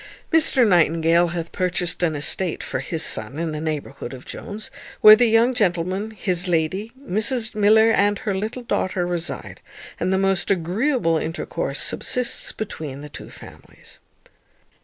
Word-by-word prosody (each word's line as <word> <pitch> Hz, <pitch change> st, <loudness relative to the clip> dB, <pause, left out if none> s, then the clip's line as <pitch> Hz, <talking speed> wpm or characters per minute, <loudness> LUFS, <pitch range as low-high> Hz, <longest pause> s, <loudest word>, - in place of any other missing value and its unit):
Mr 290 Hz, -7 st, +4 dB
Nightingale 170 Hz, -1 st, +3 dB
hath 170 Hz, -1 st, -5 dB
purchased 180 Hz, -1 st, -1 dB
an 165 Hz, -3 st, +1 dB
estate 165 Hz, +4 st, 0 dB
for -, -, -4 dB
his 165 Hz, -1 st, -2 dB
son 140 Hz, -, +1 dB
in 165 Hz, 0 st, -2 dB
the 155 Hz, 0 st, -5 dB
neighbourhood 145 Hz, -4 st, -5 dB
of 130 Hz, -, -13 dB
Jones, 210 Hz, +1 st, -7 dB, 0.3 s
where 215 Hz, 0 st, +10 dB
the 240 Hz, +2 st, +3 dB
young 230 Hz, +3 st, +4 dB
gentleman, 190 Hz, -1 st, 0 dB
his 185 Hz, -4 st, -2 dB
lady, 180 Hz, +6 st, -1 dB
Mrs 230 Hz, -1 st, -1 dB
Miller, 220 Hz, +1 st, +4 dB
and 205 Hz, -1 st, +2 dB
her 215 Hz, -4 st, -3 dB
little 215 Hz, +6 st, -4 dB
daughter 185 Hz, -5 st, -1 dB
reside, 175 Hz, -1 st, -5 dB, 0.4 s
and 185 Hz, -, 0 dB
the 190 Hz, -, +2 dB
most 195 Hz, -1 st, +1 dB
agreeable 190 Hz, -, +1 dB
intercourse 165 Hz, +4 st, -3 dB
subsists 250 Hz, -1 st, -1 dB
between 150 Hz, -10 st, -6 dB
the 150 Hz, -, -9 dB
two -, -, -10 dB
families. -, -, -15 dB
185 Hz, 150 wpm, -22 LUFS, 165-220 Hz, 0.4 s, where